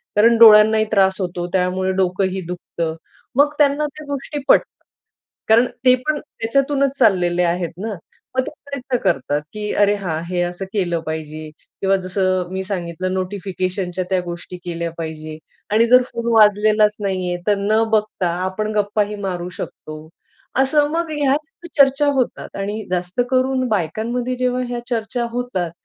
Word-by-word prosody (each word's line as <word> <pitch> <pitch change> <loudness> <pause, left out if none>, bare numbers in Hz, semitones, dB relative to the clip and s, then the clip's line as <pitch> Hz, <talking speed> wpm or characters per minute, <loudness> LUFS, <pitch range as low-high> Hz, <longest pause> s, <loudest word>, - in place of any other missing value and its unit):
कारण 230 +3 +5
डोळ्यांनाही 220 -1 +7
त्रास 190 -2 +3
होतो, 175 -1 -3
त्यामुळे 185 0 +1
डोकंही 190 +1 0
दुखतं." 170 -2 -4 0.4
मग 290 +1 +4
त्यांना 295 0 +3
त्या 310 - -9
गोष्टी 285 +1 -4
पटतात. - - +2 0.6
कारण 230 +3 +5 0.2
ते 255 - +8
पण 305 -1 +2
त्याच्यातूनच 275 +1 -1
चाललेले 180 -2 +3
आहेत 175 0 0
ना, 215 +2 -4 0.4
मग - - +4
ते - - -4
प्रयत्न 270 -3 -3
करतात, 140 +2 +1
की 210 -1 -4
अरे, 205 0 +3
हां, 170 -6 -3
हे 180 0 -1
असं 175 +2 -3
केलं 175 -5 0
पाहिजे 155 0 -5 0.3
किंवा 195 0 +3
जसं 185 -1 0
मी 190 0 -2
सांगितलं 185 -1 -3
नोटिफिकेशनच्या 185 -1 -3
त्या 190 -1 +2
गोष्टी 175 +1 -7
केल्या 170 -1 -3
पाहिजे 155 -1 -6 0.4
आणि 225 +2 +4
जर 250 +1 +7
फोन 235 0 -4
वाजलेलाच 210 -1 +4
नाहीये 185 -3 -1
तर 210 - +4
न 215 +3 +2
बघता 215 -4 +1 0.2
आपण 210 +3 -2
गप्पाही 210 0 0
मारू 180 -2 -3
शकतो. 155 0 -8 0.5
असं, 290 +2 +3
मग 335 +1 -1
ह्या 290 -3 +1 0.4
चर्चा 275 +1 +5
होतात 255 - -2
आणि 205 +2 -3
जास्त 180 +4 -1
करून 260 0 +1
बायकांमध्ये 225 +6 -1
जेव्हा 250 0 0
ह्या 240 0 -3
चर्चा 235 +1 -1
होतात 240 -8 -2
205 Hz, 150 wpm, -20 LUFS, 180-240 Hz, 0.6 s, ते